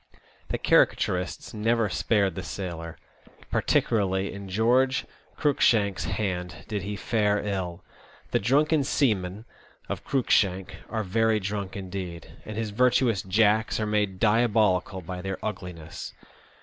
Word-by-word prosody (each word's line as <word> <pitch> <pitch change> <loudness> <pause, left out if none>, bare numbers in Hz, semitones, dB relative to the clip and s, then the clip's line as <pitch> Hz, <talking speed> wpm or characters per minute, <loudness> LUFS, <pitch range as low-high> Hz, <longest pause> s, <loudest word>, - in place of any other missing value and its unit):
The - - -2
caricaturists 90 0 +1
never 115 +1 +1
spared 100 0 +1
the 95 - -5
sailor; 85 -1 -6 0.5
particularly 95 -3 +1
in 100 -1 -8
George 125 +6 +2 0.3
Cruikshank's 110 - +2
hand 90 -4 -3
did 105 -2 -2
he 100 +2 -4
fare 105 0 +1
ill. 95 -3 -3 0.5
The - - +3
drunken 145 +7 +3
seamen 105 -7 0 0.4
of - - -4
Cruikshank 95 -8 +1 0.2
are 110 -1 -2
very 110 +3 +2
drunk 100 0 -4
indeed, 90 -4 -6
and 110 0 -6
his 110 -2 -2
virtuous 120 -2 +3
Jacks 110 +3 +2
are 110 - 0
made 105 -3 0
diabolical 105 -4 +2
by 90 +1 -6
their 95 0 -3
ugliness. 90 -7 -6
100 Hz, 125 wpm, -26 LUFS, 95-110 Hz, 0.5 s, The